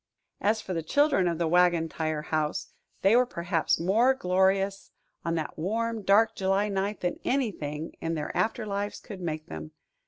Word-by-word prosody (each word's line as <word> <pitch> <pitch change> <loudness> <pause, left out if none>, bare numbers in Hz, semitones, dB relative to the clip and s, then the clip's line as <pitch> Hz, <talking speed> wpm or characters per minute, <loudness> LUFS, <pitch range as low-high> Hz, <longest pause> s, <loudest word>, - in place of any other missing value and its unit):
As 215 +2 +2
for 185 - -4
the 165 - -1
children 240 - +2
of 170 -1 0
the 170 0 0
Wagon 175 -1 +3
Tire 155 -1 -3
House, 155 -1 -2 0.3
they 195 +4 +6
were 250 0 +4
perhaps 170 -5 0
more 225 +10 +3
glorious 195 -1 +1 0.3
on 165 0 -1
that 160 -1 -4
warm, 225 +5 -1
dark 215 +3 +4
July 195 +2 +1
night 200 +1 -2
than 180 -1 -2
anything 165 - -2
in 165 0 -1
their 150 -1 -4
after 225 0 0
lives 205 0 -3
could 200 -5 -9
make 155 -2 -3
them. 80 -1 -8
190 Hz, 175 wpm, -28 LUFS, 165-210 Hz, 0.3 s, they